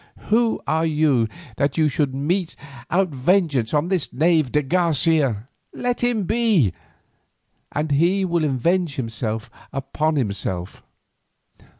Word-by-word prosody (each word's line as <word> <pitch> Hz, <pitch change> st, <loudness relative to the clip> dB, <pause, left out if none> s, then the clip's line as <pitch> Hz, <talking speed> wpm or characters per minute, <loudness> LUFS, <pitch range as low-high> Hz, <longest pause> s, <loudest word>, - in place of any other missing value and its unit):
Who 230 Hz, +1 st, +2 dB
are 160 Hz, +1 st, +1 dB
you 150 Hz, -7 st, +2 dB, 0.3 s
that 140 Hz, 0 st, 0 dB
you 155 Hz, -1 st, +4 dB
should 140 Hz, -2 st, -1 dB
mete 165 Hz, +6 st, -1 dB, 0.3 s
out 185 Hz, +1 st, +2 dB
vengeance 145 Hz, -, +1 dB
on 150 Hz, +3 st, +1 dB
this 185 Hz, -7 st, 0 dB
knave 155 Hz, -1 st, +2 dB
de 150 Hz, -, +2 dB
Garcia? 150 Hz, -, +2 dB, 0.3 s
Let 245 Hz, 0 st, -2 dB
him 240 Hz, -4 st, +1 dB
be, 210 Hz, -, +2 dB, 1.0 s
and 150 Hz, +1 st, -2 dB
he 175 Hz, +7 st, +2 dB
will 170 Hz, -2 st, 0 dB
avenge 155 Hz, +4 st, 0 dB
himself 115 Hz, -2 st, -4 dB, 0.2 s
upon 155 Hz, +3 st, -1 dB
himself. 100 Hz, -7 st, -3 dB
155 Hz, 120 wpm, -22 LUFS, 130-180 Hz, 1.0 s, you